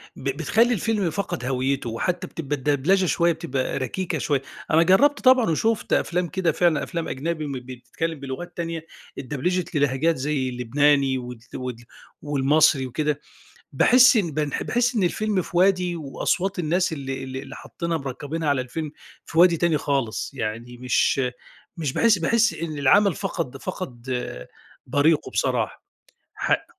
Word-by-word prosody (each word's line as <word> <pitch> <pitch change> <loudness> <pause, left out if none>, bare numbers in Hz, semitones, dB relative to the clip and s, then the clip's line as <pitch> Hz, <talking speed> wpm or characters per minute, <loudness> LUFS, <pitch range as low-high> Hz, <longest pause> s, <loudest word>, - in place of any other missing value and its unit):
ب 135 - -4
بتخلّي 220 - +2
الفيلم 210 -3 0
فقد 160 -7 -3
هويّته، 130 -1 -1
وحتى 175 +10 -2
بتبقى 145 -3 -3 0.2
الدبلچة 185 +7 +2
شوية 170 0 +2
بتبقى 130 -2 -3
ركيكة 170 +8 -2
شوية، 140 -3 0 0.3
أنا 160 +2 +5
جرّبت 280 +12 +4
طبعًا 255 -6 +5
وشُفت 220 +7 0
أفلام 175 0 +1
كده 175 -2 0
فعلًا 165 0 +2
أفلام 170 -2 -4
أجنبي 155 +2 -3
م - - -4
بتتكلم 130 +5 -5
بلغات 140 +7 -7
تانية 165 -1 -4 0.3
اتدبلچت 165 +6 -2
للهجات 145 +3 +2
زي 135 -1 -1
اللبناني 135 +2 +2
وال 125 -1 -7 0.2
وال 125 -2 -4 0.5
والمصري 145 -1 +3
وكده 150 +3 -1 0.5
باحس 245 - +6
إن 180 -7 +1
بانح 150 -1 -2
باحس 245 0 +1
إن 210 - +1
الفيلم 200 +1 0
في 175 - -8
وادي 180 -2 +3
وأصوات 180 +6 -2
الناس 175 +2 +1
اللي 135 -3 -4
اللي 130 0 -6
اللي - - -10
حطّينها 170 -1 -4
مركبينها 145 +4 -4
على 140 -2 +2
الفيلم 145 +4 -5 0.3
في 165 - -4
وادي 175 -1 +6
تاني 165 -2 +2
خالص، 135 -6 -1
يعني 115 +1 -4
مش 125 +2 +2 0.6
مش 150 -5 -2
باحس 220 +1 +4
باحس 230 +7 +2
إن 155 -2 -5
العمل 185 +8 +4
فقد 135 -1 -4
فقد 130 -7 -7 0.8
بريقُه 150 +2 +2
بصراحة - - -1 0.5
حق - - 0
155 Hz, 150 wpm, -24 LUFS, 135-180 Hz, 0.8 s, باحس